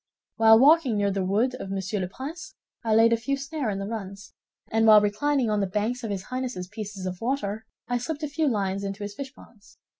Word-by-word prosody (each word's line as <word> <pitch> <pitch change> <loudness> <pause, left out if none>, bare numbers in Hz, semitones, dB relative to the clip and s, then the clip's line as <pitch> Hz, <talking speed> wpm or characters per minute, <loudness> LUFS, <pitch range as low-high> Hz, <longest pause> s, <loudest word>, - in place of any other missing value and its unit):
While 225 0 +7
walking 275 -3 +5
near 200 -1 +1
the 195 -1 -1
wood 215 +7 +1
of 195 - -6
Monsieur 195 +1 -2
le 185 - -2
Prince, 280 - -8 0.3
I 220 -2 +2
laid 230 +1 +6
a - - +3
few 275 +5 -2
snares 275 -5 -3
in - - -4
the 195 - -4
runs; 200 -2 -7 0.4
and 225 0 +3
while 215 -1 +9
reclining 235 +4 +1
on 210 - +1
the 195 - 0
banks 215 +6 -2
of 225 - -3
his 195 -2 -3
Highness's 250 -6 -4
pieces 210 -2 -7
of 185 -1 -5
water, 220 -4 -2 0.2
I 245 0 0
slipped 305 +5 -5
a - - 0
few 305 +2 -1
lines 200 -5 -1
into 200 +1 -4
his 205 0 -5
fish 270 +4 -7
ponds. 215 -5 -19
220 Hz, 230 wpm, -26 LUFS, 200-255 Hz, 0.4 s, while